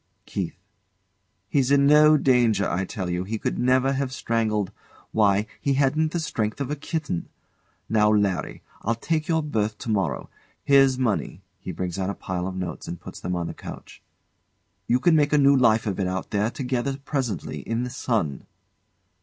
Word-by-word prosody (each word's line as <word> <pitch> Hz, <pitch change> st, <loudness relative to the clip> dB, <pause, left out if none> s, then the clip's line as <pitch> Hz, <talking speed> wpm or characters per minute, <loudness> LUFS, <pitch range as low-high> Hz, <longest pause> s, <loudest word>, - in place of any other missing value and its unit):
KEITH. -, -, -4 dB, 0.9 s
He's 135 Hz, +2 st, +1 dB
in 140 Hz, 0 st, +5 dB
no 150 Hz, +1 st, +7 dB
danger, 120 Hz, -7 st, +3 dB
I 95 Hz, +2 st, -1 dB
tell 95 Hz, -2 st, -4 dB
you. 90 Hz, +1 st, -1 dB
He 110 Hz, +4 st, -3 dB
could -, -, -2 dB
never 130 Hz, +2 st, +3 dB
have 135 Hz, -1 st, -2 dB
strangled 110 Hz, -6 st, -1 dB, 0.4 s
Why, 105 Hz, -1 st, +3 dB, 0.2 s
he 140 Hz, -1 st, +1 dB
hadn't 150 Hz, +3 st, +2 dB
the 175 Hz, -, -1 dB
strength 115 Hz, -9 st, -2 dB
of 140 Hz, 0 st, -3 dB
a -, -, 0 dB
kitten. 145 Hz, -, -4 dB, 0.6 s
Now, 105 Hz, -1 st, +3 dB
Larry! 100 Hz, -5 st, 0 dB, 0.2 s
I'll 115 Hz, +2 st, 0 dB
take 155 Hz, +6 st, -1 dB
your 160 Hz, -2 st, +1 dB
berth 110 Hz, -7 st, -1 dB
to 115 Hz, -, -4 dB
morrow. 95 Hz, -11 st, -1 dB, 0.4 s
Here's 135 Hz, -2 st, +5 dB
money 110 Hz, -6 st, -1 dB, 0.2 s
[He 95 Hz, -, -6 dB
brings 90 Hz, +2 st, -4 dB
out 95 Hz, 0 st, -1 dB
a 100 Hz, -, -3 dB
pile 90 Hz, 0 st, -3 dB
of 95 Hz, -, -5 dB
notes 90 Hz, -2 st, -5 dB
and 85 Hz, -, -5 dB
puts -, -, -10 dB
them 90 Hz, -, -3 dB
on 85 Hz, -1 st, -2 dB
the -, -, -5 dB
couch] -, -, -10 dB, 0.9 s
You 125 Hz, -, +3 dB
can 165 Hz, +4 st, +4 dB
make 150 Hz, -1 st, +3 dB
a -, -, +6 dB
new 140 Hz, -1 st, +6 dB
life 115 Hz, -4 st, +4 dB
of 100 Hz, -3 st, -2 dB
it 95 Hz, -, +1 dB
out 95 Hz, 0 st, -4 dB
there 105 Hz, +1 st, +1 dB
together 130 Hz, +1 st, -2 dB
presently, 135 Hz, -, -3 dB
in 115 Hz, +1 st, -2 dB
the 125 Hz, -, -4 dB
sun. 95 Hz, -, -2 dB
115 Hz, 185 wpm, -25 LUFS, 100-140 Hz, 0.9 s, no